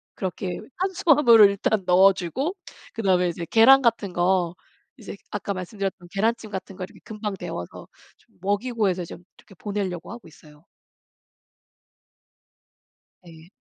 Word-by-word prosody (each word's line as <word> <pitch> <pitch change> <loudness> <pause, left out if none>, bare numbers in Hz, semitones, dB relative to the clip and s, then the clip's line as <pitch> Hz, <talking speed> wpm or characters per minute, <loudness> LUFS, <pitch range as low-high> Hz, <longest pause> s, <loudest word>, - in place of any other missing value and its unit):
그렇게 185 -1 -4 0.2
탄수화물을 295 - +5
일단 200 +1 -1
넣어주고 190 - +2 0.4
그다음에 185 -5 +1
이제 170 0 -5
계란 265 +4 +7
같은 225 -6 0
거 175 -1 +1 0.4
이제 210 -4 -9
아까 205 -1 -3
말씀드렸던 185 -1 -5
계란찜 220 +1 -1
같은 190 0 -6
거 185 - -5
이렇게 - - -18
금방 210 -2 -5
데워서 85 - -7 0.3
좀 - - -31
먹이고 210 +3 0
해서 180 -1 -2
좀 170 - -11
이렇게 195 - -19
보내려고 195 -3 -4
하고 235 -6 -10
있어요. 150 0 -19 2.6
네. 165 0 -15
195 Hz, 300 characters per minute, -24 LUFS, 180-225 Hz, 2.6 s, 계란